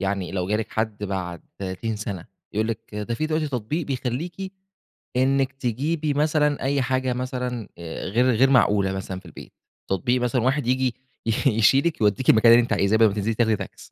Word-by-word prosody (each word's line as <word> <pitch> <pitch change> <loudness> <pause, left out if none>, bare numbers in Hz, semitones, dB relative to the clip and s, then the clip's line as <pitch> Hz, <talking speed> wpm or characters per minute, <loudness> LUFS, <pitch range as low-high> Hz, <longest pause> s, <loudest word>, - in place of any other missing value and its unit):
يعني 95 -2 -2
لو 90 -1 -2
جالِك 105 +1 -1
حد 110 -2 -2
بعد 90 -4 -4 0.2
30 100 +4 -3
سنة، 100 -4 -5 0.3
يقول 110 +2 0
لِك 115 -1 -6
ده 105 +3 -3
في 155 +6 -1
دلوقتي 155 -1 -1
تطبيق 135 +6 -3
بيخليكِ، 155 +9 -4 0.6
إنِك 135 +1 +2
تجيبي 145 +5 -1
مثلًا 150 0 +1
أي 140 0 +1
حاجة 130 0 0
مثلًا 125 -3 -4
آآ 85 -1 -6
غير 120 +6 +2
غير 130 +4 +4
معقولة 100 -7 +3
مثلًا 95 -1 -5
في - - -23
البيت، - - -12 0.4
تطبيق 120 +7 +1
مثلًا 125 0 +1
واحد 130 0 +1
ييجي 130 -1 +1 0.5
يشيلِك 135 +6 +3
يوديكِ 105 +4 +2
المكان 115 +1 +7
اللي 120 +1 +8
أنتِ 120 - -1
عايزاة، 100 +3 +2
بدل 110 0 +6
ما 100 - -1
تنزلي 105 +2 -1
تاخدي 110 -1 +2
تاكس. - - -9
120 Hz, 180 wpm, -24 LUFS, 105-135 Hz, 0.6 s, اللي